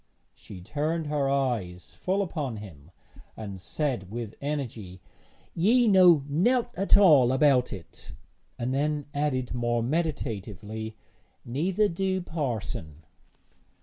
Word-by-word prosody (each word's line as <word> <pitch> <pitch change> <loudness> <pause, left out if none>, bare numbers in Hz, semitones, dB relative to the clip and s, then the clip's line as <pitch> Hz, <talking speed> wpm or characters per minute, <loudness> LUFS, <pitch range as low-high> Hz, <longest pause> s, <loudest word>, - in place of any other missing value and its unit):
She 95 -3 -12
turned 155 - -2
her 145 -2 0
eyes 120 -11 -2
full 195 +2 -1
upon 145 - -4
him, 85 -8 -11 0.5
and 100 -4 -7
said 120 - -2
with 115 0 -5
energy: 120 -10 -4 0.5
'Ye 230 +8 +3
know 180 -7 +6
nowt 240 - +1
at 195 -1 +4
all 150 -11 +6
about 130 -2 +3
it;' 95 -5 -10 0.4
and 125 +2 -2
then 145 +1 0
added 140 -4 -1
more 120 -1 0
meditatively, 110 - -3 0.5
'neither 175 - +1
do 190 +1 -1
parson.' 115 - -4
135 Hz, 115 wpm, -27 LUFS, 110-165 Hz, 0.5 s, know